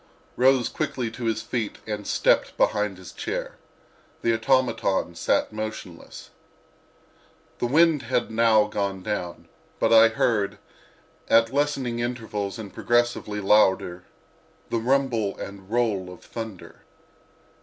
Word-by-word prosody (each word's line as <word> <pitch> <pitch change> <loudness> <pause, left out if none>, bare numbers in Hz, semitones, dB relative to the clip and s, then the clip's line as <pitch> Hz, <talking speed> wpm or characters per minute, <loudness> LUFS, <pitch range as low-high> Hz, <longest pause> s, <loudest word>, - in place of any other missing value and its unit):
rose 130 -1 +4
quickly 135 -6 -3
to 120 +1 -6
his 110 -1 -1
feet 115 -4 -3
and 105 -1 -5
stepped - - +2
behind 105 -3 +1
his 90 -1 -11
chair. - - -5 0.7
The 115 - +3
automaton 115 -6 +1
sat 85 - 0
motionless. 110 -5 -7 1.3
The 120 - 0
wind 160 +2 +4
had 120 - -1
now 110 -1 +4
gone 100 -3 -3
down, 90 -5 -4 0.3
but - - +3
I 115 0 +8
heard, 110 -2 0 0.7
at 115 +1 +4
lessening 140 -4 0
intervals 110 -4 -3
and 105 -4 -8
progressively 120 -3 0
louder, 95 -3 +3 0.7
the 115 - +1
rumble 120 -4 0
and 100 -1 -9
roll 105 -6 0
of 90 - -13
thunder. 110 -5 -8
110 Hz, 120 wpm, -25 LUFS, 100-120 Hz, 1.3 s, I